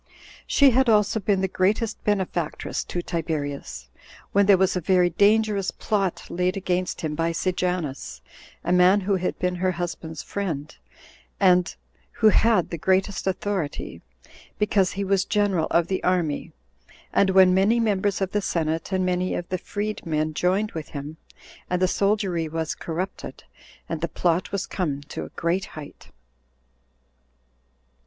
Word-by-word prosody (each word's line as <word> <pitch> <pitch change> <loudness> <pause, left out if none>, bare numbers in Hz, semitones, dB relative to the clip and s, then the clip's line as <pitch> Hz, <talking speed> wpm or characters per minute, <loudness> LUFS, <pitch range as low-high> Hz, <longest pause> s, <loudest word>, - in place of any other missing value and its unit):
She 280 -2 +5
had 260 +1 +3
also 210 0 +3
been 195 -1 +1
the 190 - +1
greatest 205 +4 0
benefactress 185 -6 -1
to 175 - -4
Tiberius, 145 - -4 0.4
when 200 0 +3
there 200 -2 +7
was 190 0 +2
a 180 - -1
very 180 0 +3
dangerous 205 +1 +3
plot 195 -4 -1
laid 180 +2 -1
against 180 -1 -2
him 155 -2 -2
by 165 +2 0
Sejanus, 165 - -2 0.4
a 175 - -1
man 180 +3 +5
who 195 0 +1
had 180 - -2
been 180 0 0
her 185 +1 0
husband's 170 -2 -5
friend, 160 -7 -4 0.6
and 180 -2 +4 0.4
who 220 - +5
had 215 -4 +3
the 170 - -4
greatest 190 +3 +1
authority, 190 -5 -3 0.6
because 205 -3 +2
he 200 - -2
was 195 -1 +2
general 205 -6 +1
of 170 0 +3
the 190 +2 -3
army, 175 -5 0 0.6
and 195 - +4
when 190 -1 +6
many 200 +5 +3
members 205 -3 0
of 190 -1 -1
the 210 - 0
senate 165 -2 -2
and 185 -1 +1
many 180 0 0
of 175 - -4
the 185 - -2
freed 210 +3 -4
men 155 -1 -1
joined 190 +6 +1
with 160 -2 -6
him, 145 +2 -7 0.5
and 180 - 0
the 185 - +3
soldiery 195 -5 0
was 160 0 -2
corrupted, 180 +4 -5 0.4
and - - -4
the - - 0
plot 175 0 0
was 200 -1 -2
come 150 -7 -2
to 145 - -6
a - - -10
great 175 +3 -1
height. 145 -2 -10
185 Hz, 155 wpm, -24 LUFS, 170-200 Hz, 0.6 s, there